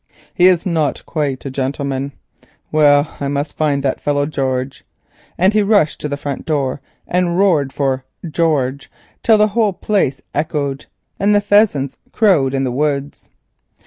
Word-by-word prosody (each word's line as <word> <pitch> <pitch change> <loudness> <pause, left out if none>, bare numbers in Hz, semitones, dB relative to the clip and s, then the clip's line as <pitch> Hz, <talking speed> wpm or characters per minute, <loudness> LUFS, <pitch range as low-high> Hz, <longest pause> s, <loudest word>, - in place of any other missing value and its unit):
He 180 - +5
is 185 0 +3
not 160 -5 0
quite 145 -5 -3
a 135 - -4
gentleman. 135 +1 -3 0.6
Well, 145 -1 +3
I 140 - -2
must 145 +1 -3
find 145 -3 0
that 135 - -1
fellow 145 -1 0
George," 130 -3 -3 0.5
and 190 +4 +3
he 215 - +3
rushed 200 -7 +2
to 150 - -3
the 140 - -3
front 140 -1 -5
door 140 -4 -1 0.3
and 180 -1 0
roared 165 -9 +2
for 135 -2 -1 0.2
"George," 145 -4 0 0.3
till 220 -2 +4
the 210 0 +3
whole 215 -1 +1
place 180 -10 0
echoed 145 -3 -2 0.3
and 205 +1 +3
the - - +5
pheasants 205 -10 +2 0.2
crowed 150 -12 +3
in 135 - 0
the 130 - -1
woods. 140 +1 -2
145 Hz, 155 wpm, -17 LUFS, 140-180 Hz, 0.6 s, He